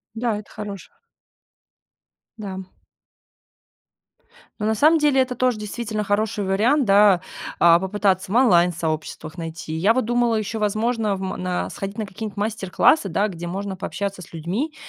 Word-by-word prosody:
Да, 225 -2 -1
это 210 - -12
хорош 200 -3 -7 1.5
Да. 195 -3 -6 2.0
Ну, 210 - -1
на 220 - +2
самом 310 +7 +5
деле 290 -3 +3
это 255 -1 -3
тоже 250 -2 +1
действительно 215 0 -4
хороший 205 0 0
вариант, 225 +10 +2
да, 200 -3 +5 0.4
а, 170 0 +6
попытаться 190 -1 0
в - - -2
онлайн 180 -9 +5
сообществах 155 -1 -4
найти. 165 -1 -6
Я 185 +8 +2
вот 255 - +1
думала 240 0 +1
ещё 215 +1 -3
возможно, 215 0 0
в - - -8
ма 190 -1 -3
на 180 -1 -2
сходить 195 +1 -6
на 220 - -2
какие 195 +3 -7
нибудь 205 - -8
мастер-классы, 210 - +2
да, 200 +5 +1
где 175 -3 -7
можно 195 +2 -4
пообщаться 195 +1 -4
с 175 - -12
людьми, 200 - -3
205 Hz, 155 wpm, -22 LUFS, 185-225 Hz, 2.0 s, а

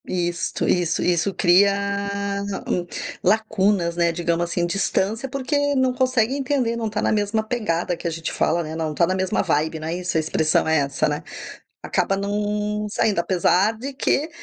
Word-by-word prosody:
Isto, 175 -2 -2
isso, 175 -1 +1
isso 180 +2 +1
cria 190 +2 +4 0.9
hum, 175 -1 -1 0.4
lacunas, 205 -5 +2
né, 170 -1 +2
digamos 170 0 0
assim, 175 0 0
distância, 200 +6 -1
porque 285 +2 0
não 260 -1 +2
consegue 255 -2 +1
entender, 265 -4 0
não 230 -1 -2
está 215 0 -2
na - - +2
mesma 215 +1 0
pegada 195 -7 -1
que 170 - -5
a - - +1
gente 165 0 -4
fala, 170 +1 +1
né, 160 0 -6
não 160 -1 -2
está 170 - +3
na 185 - 0
mesma 190 0 0
vibe, 160 +2 0
não 155 - -5
é 165 - -2
isso, 180 -1 -2
a - - +4
expressão 155 0 +1
é 160 0 +3
essa, 140 -1 0
né. 150 +1 -3 0.6
Acaba 195 - 0
não 210 +1 -1
saindo, 205 -2 +1
apesar 185 +4 +2
de 270 +5 -6
que 285 +3 0
190 Hz, 180 wpm, -22 LUFS, 170-220 Hz, 0.9 s, cria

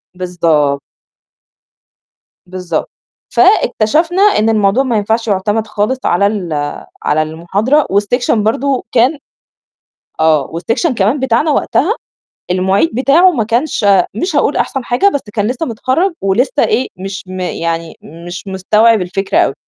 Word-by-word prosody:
بالضب 165 -6 0 1.7
بالضبط. 180 -3 -4 0.4
فاكتشفنا 345 - +2
إن 310 - +3
الموضوع 215 +3 +2
ما 240 -5 0
ينفعش 225 +3 -1
يُعتمد 210 +2 0
خالص 215 +5 -1
على 200 +3 +2
ال 195 -6 -3 0.5
على 150 +1 +1
المحاضرة 195 - 0
والسيكشن 210 +2 +1
برضه 255 +5 0
كان 255 +5 +2 1.0
آه، 155 -2 +3
والسيكشن 230 - -1
كمان 220 +6 +1
بتاعنا 265 +4 +1
وقتها 330 +6 +1 0.6
المعيد 190 - +1
بتاعه 290 +9 +4
ما 250 -10 -1
كانش 235 +2 -1 0.3
مش 355 - -2
هاقول - - +1
أحسن 270 -2 -2
حاجة، 245 +11 +2
بس 285 - -1
كان 210 -2 0
لسّه 255 +7 -2
متخرّج 260 - -1
ولسّه 235 +9 +1
إيه، 245 +4 0
مش 195 +1 -6
م 185 0 -7
يعني 165 -2 -3
مش 175 +4 -10
مستوعب 210 +3 +2
الفكرة 185 +2 -2
أوي، - - +2
215 Hz, 130 wpm, -14 LUFS, 185-260 Hz, 1.7 s, بتاعه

